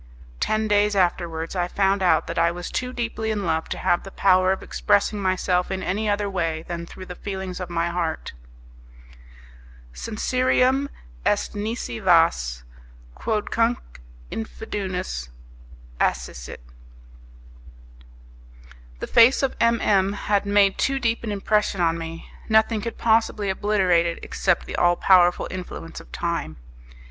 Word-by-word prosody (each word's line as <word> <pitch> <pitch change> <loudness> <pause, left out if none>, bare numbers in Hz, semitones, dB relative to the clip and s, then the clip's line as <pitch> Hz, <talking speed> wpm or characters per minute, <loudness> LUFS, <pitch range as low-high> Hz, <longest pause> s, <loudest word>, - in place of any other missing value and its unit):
Ten 215 0 0
days 205 0 +2
afterwards 170 -2 0
I 175 -1 0
found 195 +1 +1
out 165 -3 +3
that - - -3
I 170 0 +4
was 175 +1 -6
too 250 0 -2
deeply 230 -2 -3
in 210 -3 -2
love 160 -1 -1
to - - -3
have 175 - +1
the 195 - -9
power 185 -1 +3
of 190 - -2
expressing 205 0 +1
myself 185 -1 +1
in 190 0 -3
any 210 +4 -1
other 205 0 0
way 165 -4 -2
than 170 0 -6
through 185 - -10
the 180 - -7
feelings 190 -1 -6
of 180 -2 -5
my 170 0 0
heart. 170 -2 -3 1.6
'Sincerium 255 - +1 0.3
est - - 0
nisi 220 +2 -4
vas, 165 - +3 0.5
quodcunque 230 - -1 0.3
infundis 190 - -4 0.7
acescit.' - - -2 2.4
The - - -2
face 240 +4 +5
of 270 - 0
M 230 0 +3
M 195 -1 +2
had 205 0 0
made 200 -1 +3
too 275 0 +1
deep 230 -3 -1
an 220 - -3
impression 205 -1 0
on 165 -1 +1
me; 165 0 -7 0.2
nothing 220 0 +3
could 230 +2 -5
possibly 220 -3 +2
obliterate 190 -4 +2
it 170 - -3
except 180 -3 0
the - - -5
all 175 0 +4
powerful 175 -1 +4
influence 180 -3 -7
of - - -15
time. 170 - -3
190 Hz, 140 wpm, -23 LUFS, 175-215 Hz, 2.4 s, face